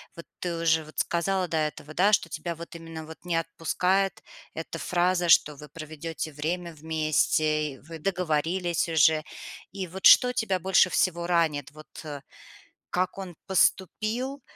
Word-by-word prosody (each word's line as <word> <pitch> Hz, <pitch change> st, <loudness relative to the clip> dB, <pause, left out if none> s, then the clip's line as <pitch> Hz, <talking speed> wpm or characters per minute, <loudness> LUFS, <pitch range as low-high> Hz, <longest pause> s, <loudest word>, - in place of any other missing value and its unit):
Вот 170 Hz, -, -10 dB
ты 175 Hz, -2 st, -3 dB
уже, 160 Hz, -1 st, +2 dB
вот, 155 Hz, -, -15 dB
сказала 180 Hz, +2 st, 0 dB
до 160 Hz, -, -2 dB
этого, 155 Hz, 0 st, -3 dB
да, 195 Hz, +5 st, +3 dB
что 185 Hz, -, +3 dB
тебя 170 Hz, +1 st, -5 dB
вот 170 Hz, +1 st, -10 dB
именно 165 Hz, -1 st, -8 dB
вот 160 Hz, 0 st, -10 dB
не 175 Hz, -2 st, -2 dB
отпускает 180 Hz, +4 st, 0 dB, 0.3 s
эта 165 Hz, 0 st, -6 dB
фраза, 175 Hz, +1 st, +1 dB
что 150 Hz, -1 st, +5 dB
вы 150 Hz, 0 st, -12 dB
проведёте 155 Hz, +1 st, -6 dB
время 170 Hz, +3 st, -3 dB
вместе, 155 Hz, -1 st, 0 dB
и -, -, -13 dB
вы 160 Hz, +1 st, -10 dB
договорились 175 Hz, 0 st, 0 dB
уже. 155 Hz, -1 st, +4 dB, 0.5 s
И 195 Hz, -2 st, -4 dB
вот 185 Hz, +2 st, +2 dB
что 250 Hz, 0 st, +7 dB
тебя 195 Hz, -6 st, 0 dB
больше 185 Hz, +1 st, +4 dB
всего 170 Hz, -2 st, 0 dB
ранит? 160 Hz, -6 st, +1 dB
Вот, 155 Hz, 0 st, -14 dB, 0.2 s
э, 145 Hz, -3 st, -7 dB, 0.7 s
как 185 Hz, +1 st, -1 dB
он 185 Hz, -4 st, -7 dB
поступил? 220 Hz, +8 st, 0 dB
165 Hz, 155 wpm, -27 LUFS, 155-185 Hz, 0.7 s, что